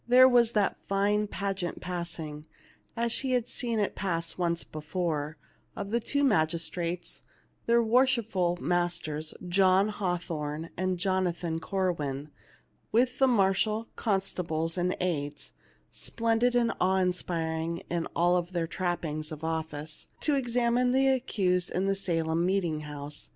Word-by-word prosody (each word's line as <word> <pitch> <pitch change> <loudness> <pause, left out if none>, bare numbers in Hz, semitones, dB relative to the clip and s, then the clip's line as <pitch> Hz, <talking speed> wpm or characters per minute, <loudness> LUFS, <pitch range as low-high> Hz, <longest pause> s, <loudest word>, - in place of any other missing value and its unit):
There 255 +1 +8
was 240 -2 +4
that 205 -2 +2
fine 205 +2 +2
pageant 195 -3 -3
passing, 165 -4 -5 0.5
as 235 0 +1
she 260 +2 0
had 245 -2 +1
seen 235 -3 -2
it 205 -2 0
pass 170 -4 -2
once 170 -1 0
before, 155 -1 -3 0.4
of 200 0 -5
the 235 - +2
two 285 +5 0
magistrates, 170 - 0 0.5
their 235 0 +5
worshipful 225 -7 +2
masters 165 -3 -1
John 190 +2 +4
Hathorneand 175 -1 -2
Jonathan 175 -3 0
Corwin, 155 -7 -2 0.6
with 250 +3 +2
the 265 - +6
marshal, 215 0 +2
constables, 175 -6 -1
and 180 0 0
aids, 150 -6 -2 0.4
splendid 230 +2 +1
and 235 -1 +3
awe 190 +1 +3
inspiring 170 -2 -1
in 170 -1 -1
all 175 +1 +4
their 175 -1 -3
trappings 165 -3 -2
of 155 0 -7
office, 160 -2 -4
to 300 - +2
examine 245 -1 +2
the 270 +1 +4
accused 190 -9 +1
in 185 +2 -1
the 195 - +2
Salem 165 -3 0
meeting 175 -4 +1
house. 145 -1 -7
180 Hz, 130 wpm, -29 LUFS, 165-220 Hz, 0.6 s, There